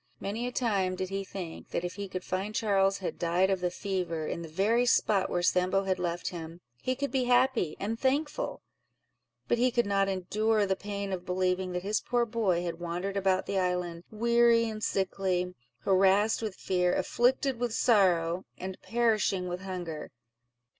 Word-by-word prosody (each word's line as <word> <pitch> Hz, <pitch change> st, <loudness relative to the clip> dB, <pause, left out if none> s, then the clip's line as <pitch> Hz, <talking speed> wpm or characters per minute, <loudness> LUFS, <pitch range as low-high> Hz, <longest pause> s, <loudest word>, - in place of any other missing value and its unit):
Many 220 Hz, +5 st, -3 dB
a -, -, -3 dB
time 200 Hz, -7 st, 0 dB
did 185 Hz, 0 st, -3 dB
he 195 Hz, 0 st, -2 dB
think, 185 Hz, -4 st, -7 dB
that -, -, -2 dB
if 175 Hz, -, -3 dB
he 200 Hz, -1 st, -6 dB
could 185 Hz, -1 st, -5 dB
find 195 Hz, +3 st, -3 dB
Charles 195 Hz, -5 st, +2 dB
had 190 Hz, -, -5 dB
died 175 Hz, +3 st, +2 dB
of 190 Hz, -, +1 dB
the 180 Hz, 0 st, 0 dB
fever, 180 Hz, -4 st, -3 dB
in 170 Hz, -, -3 dB
the 165 Hz, -, -6 dB
very 210 Hz, +9 st, +2 dB
spot 205 Hz, -5 st, +2 dB
where 175 Hz, -, -1 dB
Sambo 185 Hz, +2 st, +2 dB
had 190 Hz, -1 st, -1 dB
left 175 Hz, -1 st, -2 dB
him, 165 Hz, -1 st, -8 dB, 0.2 s
he 255 Hz, -, -1 dB
could 280 Hz, +2 st, -3 dB
be 260 Hz, -2 st, +1 dB
happy 245 Hz, -9 st, +3 dB
and 220 Hz, +3 st, -3 dB
thankful; 285 Hz, +3 st, -1 dB, 0.8 s
but 240 Hz, -, +1 dB
he 250 Hz, +1 st, +4 dB
could 240 Hz, -1 st, +1 dB
not 195 Hz, -1 st, +2 dB
endure 210 Hz, +3 st, +1 dB
the 190 Hz, -1 st, +1 dB
pain 200 Hz, 0 st, -4 dB
of 180 Hz, -1 st, -4 dB
believing 185 Hz, 0 st, 0 dB
that 180 Hz, 0 st, -3 dB
his 205 Hz, +2 st, 0 dB
poor 240 Hz, -1 st, +1 dB
boy 210 Hz, -7 st, 0 dB
had 170 Hz, -1 st, -4 dB
wandered 175 Hz, +3 st, -3 dB
about 190 Hz, -1 st, +1 dB
the 195 Hz, -, 0 dB
island, 180 Hz, -2 st, -1 dB
weary 235 Hz, +1 st, +3 dB
and 215 Hz, -1 st, -5 dB
sickly, 185 Hz, -2 st, 0 dB, 0.3 s
harassed 195 Hz, +3 st, +3 dB
with 215 Hz, -4 st, -3 dB
fear, 180 Hz, -1 st, +1 dB
afflicted 255 Hz, +1 st, +1 dB
with 245 Hz, -1 st, -1 dB
sorrow, 185 Hz, -7 st, +3 dB
and 185 Hz, 0 st, -6 dB
perishing 215 Hz, -5 st, +1 dB
with 180 Hz, +1 st, -4 dB
hunger. 180 Hz, -5 st, -5 dB
195 Hz, 180 wpm, -29 LUFS, 180-220 Hz, 0.8 s, he